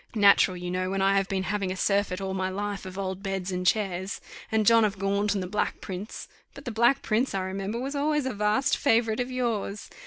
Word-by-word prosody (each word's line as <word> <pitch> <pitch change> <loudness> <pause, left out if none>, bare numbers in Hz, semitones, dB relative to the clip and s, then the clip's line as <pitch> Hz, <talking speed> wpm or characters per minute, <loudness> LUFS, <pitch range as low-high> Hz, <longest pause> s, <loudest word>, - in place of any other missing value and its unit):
Natural, 200 -3 +5
you 180 0 -5
know, 185 0 -1
when 195 0 -1
I 195 +1 +4
have 195 0 +1
been 190 -1 -1
having 195 -1 -1
a - - -3
surfeit 200 -1 +1
all 190 -1 -3
my 190 0 -1
life 200 0 -4
of 185 0 -8
old 190 -1 -3
beds 195 -2 -3
and 180 0 -2
chairs, 190 -2 0 0.3
and 220 -1 +2
John 230 +1 +6
of 205 -1 0
Gaunt 200 +1 0
and 195 - -1
the - - -4
Black 210 +3 -1
Prince. 190 +3 -7 0.3
But 275 - -11
the 245 - -3
Black 235 +5 +3
Prince, 225 +1 0
I 190 - 0
remember, 195 +4 -3
was 270 +3 -3
always 295 0 +1
a 260 - -2
vast 210 +7 +2
favourite 225 -4 +2
of 245 0 -1
yours. 230 -5 -2
200 Hz, 230 wpm, -27 LUFS, 190-225 Hz, 0.3 s, John